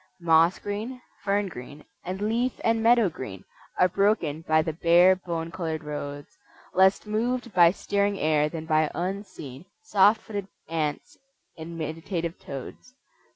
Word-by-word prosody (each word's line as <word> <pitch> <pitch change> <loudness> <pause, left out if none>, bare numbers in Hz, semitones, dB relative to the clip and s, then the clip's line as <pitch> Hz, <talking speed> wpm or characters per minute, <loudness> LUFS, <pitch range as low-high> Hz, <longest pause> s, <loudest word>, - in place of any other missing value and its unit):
Moss 165 +1 +4
green, 215 +5 -5 0.2
fern 200 0 +1
green 145 -2 -10 0.2
and 185 +2 -5
leaf 240 +3 -1
and 225 0 +2
meadow 230 -1 +5
green 105 - -7 0.4
Are 180 - +6
broken 185 -5 +1
by 155 -1 +2
the 160 -1 -3
bare, 175 +3 +5
bone 170 -2 -5
colored 160 -3 -4
roads, 145 -1 -7 0.3
Less 190 +3 +4
moved 235 +2 -2
by 175 -2 +7
stirring 200 +2 0
air 150 -2 +2
than 160 0 -6
by 155 -1 +2
unseen 180 -6 -5 0.2
Soft 210 - +4
footed 200 -3 -5 0.2
ants 155 -3 -3 0.4
and 165 0 -8
meditative 165 +2 -4
toads. 140 - -9
175 Hz, 140 wpm, -26 LUFS, 155-205 Hz, 0.4 s, by